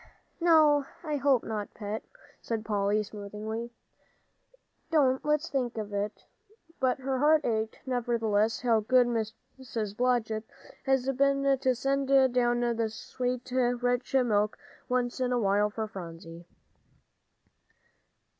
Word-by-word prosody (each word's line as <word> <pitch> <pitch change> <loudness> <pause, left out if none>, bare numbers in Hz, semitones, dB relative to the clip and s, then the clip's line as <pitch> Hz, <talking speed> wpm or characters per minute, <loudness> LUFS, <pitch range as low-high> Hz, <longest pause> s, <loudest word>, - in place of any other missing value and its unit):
"No, 310 -4 +5 0.2
I 305 -3 -1
hope 270 -3 +3
not, 215 -2 -5
Pet," 210 +1 -4 0.4
said 225 -2 -3
Polly, 205 0 +1
soothingly. 210 +3 -6 1.2
"Don't 270 -5 +3
let's 300 +2 +1
think 250 -4 -2
of 210 -2 -5
it," 205 +1 -3 0.6
but 260 -1 +2
her 265 0 -2
heart 300 +1 +4
ached, 220 -1 -1
nevertheless. 230 -4 0
How 230 -3 +3
good 250 +3 +4
Mrs. 225 -1 -4
Blodgett 230 -3 0 0.4
had 265 0 +2
been 275 0 +3
to 260 -1 +1
send 275 +2 0 0.3
down 240 -1 +2
that 230 -2 0
sweet, 250 +2 -4
rich 245 0 0
milk, 215 -5 +2 0.3
once 250 0 0
in 250 -1 0
a 250 - +2
while, 205 0 +2
for 220 +1 -4
Phronsie. 170 -3 -9
240 Hz, 120 wpm, -29 LUFS, 215-260 Hz, 1.2 s, No